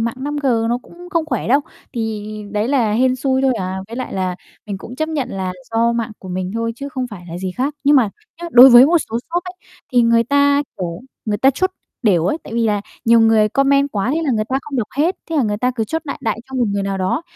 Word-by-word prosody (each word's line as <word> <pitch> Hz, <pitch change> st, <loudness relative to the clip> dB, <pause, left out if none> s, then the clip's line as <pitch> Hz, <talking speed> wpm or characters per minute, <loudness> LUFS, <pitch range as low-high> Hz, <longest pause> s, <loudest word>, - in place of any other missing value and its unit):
mạng 230 Hz, +1 st, -1 dB
5G 265 Hz, -5 st, 0 dB
nó 240 Hz, +1 st, +1 dB
cũng 355 Hz, +1 st, -13 dB
không 335 Hz, -4 st, 0 dB
khỏe 250 Hz, -6 st, -2 dB
đâu, 275 Hz, +4 st, +4 dB, 0.3 s
thì 220 Hz, -3 st, -3 dB, 0.3 s
đấy 210 Hz, +2 st, -1 dB
là 245 Hz, -6 st, +2 dB
hên 255 Hz, +3 st, +2 dB
xui 260 Hz, 0 st, 0 dB
thôi 265 Hz, -1 st, +3 dB
à. 190 Hz, -3 st, -3 dB
Với 230 Hz, -, -7 dB
lại 255 Hz, -, -4 dB
là 185 Hz, -1 st, -2 dB, 0.3 s
mình 200 Hz, -2 st, -4 dB
cũng 245 Hz, +5 st, -10 dB
chấp 315 Hz, +2 st, -1 dB
nhận 300 Hz, -5 st, -2 dB
là, 190 Hz, -1 st, -3 dB, 0.2 s
do 230 Hz, +1 st, +2 dB
mạng 230 Hz, -1 st, -2 dB
của 185 Hz, -, -11 dB
mình 185 Hz, 0 st, -3 dB
thôi, 230 Hz, 0 st, -1 dB
chứ 280 Hz, -, -6 dB
không 260 Hz, -2 st, -3 dB
phải 180 Hz, -4 st, -9 dB
là 170 Hz, -, -5 dB
gì 185 Hz, 0 st, -3 dB
khác, 275 Hz, +4 st, -1 dB
nhưng 285 Hz, +1 st, +6 dB
mà 225 Hz, -6 st, +3 dB, 0.3 s
nhá 345 Hz, -, -4 dB
đối 250 Hz, +2 st, +10 dB
với 245 Hz, +2 st, +9 dB
một 340 Hz, +3 st, +4 dB
số 230 Hz, -, -1 dB
shop 350 Hz, +1 st, 0 dB
ấy, 360 Hz, -, -7 dB, 0.4 s
thì 245 Hz, -1 st, +5 dB
người 230 Hz, 0 st, +4 dB
ta, 285 Hz, +2 st, +3 dB, 0.2 s
kiểu, 175 Hz, -1 st, -4 dB, 0.2 s
người 210 Hz, -2 st, -1 dB
ta 265 Hz, -, +5 dB
chốt 370 Hz, +8 st, 0 dB, 0.3 s
đểu 180 Hz, -7 st, +3 dB
ấy, 300 Hz, -, 0 dB
tại -, -, -8 dB
vì 230 Hz, -1 st, +1 dB
là, 210 Hz, -1 st, +1 dB, 0.2 s
nhiều 230 Hz, 0 st, +5 dB
người 225 Hz, -1 st, +4 dB
comment 275 Hz, +3 st, +2 dB
quá, 205 Hz, +4 st, 0 dB
thế 325 Hz, -, 0 dB
là 290 Hz, -, +1 dB
người 215 Hz, -2 st, 0 dB
ta 265 Hz, -, +1 dB
không 285 Hz, -1 st, -6 dB
đọc 225 Hz, -, 0 dB
hết 325 Hz, +6 st, +1 dB
thế 325 Hz, -, -1 dB
là 285 Hz, -, +3 dB
người 210 Hz, -3 st, 0 dB
ta 250 Hz, +3 st, +1 dB
cứ 225 Hz, -, 0 dB
chốt 320 Hz, +9 st, -3 dB
đại 280 Hz, -, -5 dB
đại 220 Hz, -1 st, -1 dB
cho 265 Hz, -, -10 dB
một 250 Hz, -, +2 dB
người 200 Hz, 0 st, -1 dB
nào 195 Hz, 0 st, -2 dB
đó, 185 Hz, -, 0 dB
235 Hz, 270 wpm, -19 LUFS, 210-275 Hz, 0.4 s, đối